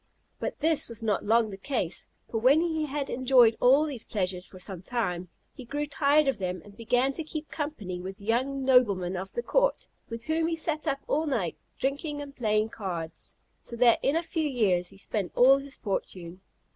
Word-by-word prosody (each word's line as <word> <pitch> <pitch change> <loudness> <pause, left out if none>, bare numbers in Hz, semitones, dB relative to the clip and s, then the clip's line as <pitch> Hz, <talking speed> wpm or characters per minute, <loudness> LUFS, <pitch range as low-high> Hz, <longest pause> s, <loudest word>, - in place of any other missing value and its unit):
But - - -4
this 315 -3 +3
was 230 -1 -9
not 210 -3 0
long 225 0 +3
the 195 - -7
case; 195 - -3 0.2
for 225 - -2
when 260 +7 +5
he 320 -2 0
had 280 0 -3
enjoyed 250 -3 +5
all 270 +5 +5
these 270 -7 -4
pleasures 180 -3 -2
for 185 - -13
some 185 -2 -2
time, 185 -5 -2 0.2
he 260 - -10
grew 290 +5 -3
tired 290 0 +3
of 265 -6 0
them, 185 -1 -2
and 205 -1 -14
began 245 +4 +1
to 325 - -2
keep 310 0 -6
company 215 - -4
with 190 +1 -7
young 260 +6 -1
noblemen 200 -9 +3
of 190 +1 -5
the 475 - -3
court, - - +1 0.2
with 230 0 -6
whom 320 +2 0
he 330 - 0
sat 315 -1 -2
up 275 -2 0
all 310 +2 0
night 210 - -1 0.2
drinking 290 +2 -2
and 285 -1 -8
playing 215 -2 +1
cards, 175 -7 -6 0.3
so 235 - -8
that 235 0 +5
in 280 - +1
a 335 - +1
few 320 -2 -1
years 190 -9 +1
he - - -14
spent 200 -1 -3
all 265 +3 +7
his 275 0 -7
fortune. 185 -3 -4
245 Hz, 200 wpm, -28 LUFS, 195-290 Hz, 0.3 s, all